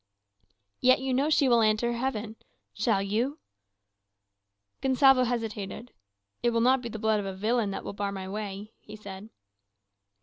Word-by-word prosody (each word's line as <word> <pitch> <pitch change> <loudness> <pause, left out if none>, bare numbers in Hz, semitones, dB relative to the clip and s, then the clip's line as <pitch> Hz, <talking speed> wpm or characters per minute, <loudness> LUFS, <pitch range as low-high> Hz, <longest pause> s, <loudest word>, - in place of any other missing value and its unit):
"Yet 255 0 +5
you 265 0 -2
know 275 +4 +2
she 290 -3 +3
will 235 -2 +4
enter 220 +2 +2
heaven. 230 -3 -3 0.4
Shall 210 -2 +1
you?" 235 +9 -1 1.4
Gonsalvo 265 -1 +5
hesitated. 225 -1 -4 0.5
"It 240 - +2
will 230 -1 +1
not 255 +2 +4
be 235 - -5
the 225 - -6
blood 220 -1 +1
of 200 - -4
a 190 - -5
villain 220 +2 0
that 195 - -5
will - - -6
bar 200 0 -3
my 190 -1 -6
way," 205 +1 -6
he 210 - -12
said. 200 0 -10
225 Hz, 160 wpm, -28 LUFS, 205-250 Hz, 1.4 s, Yet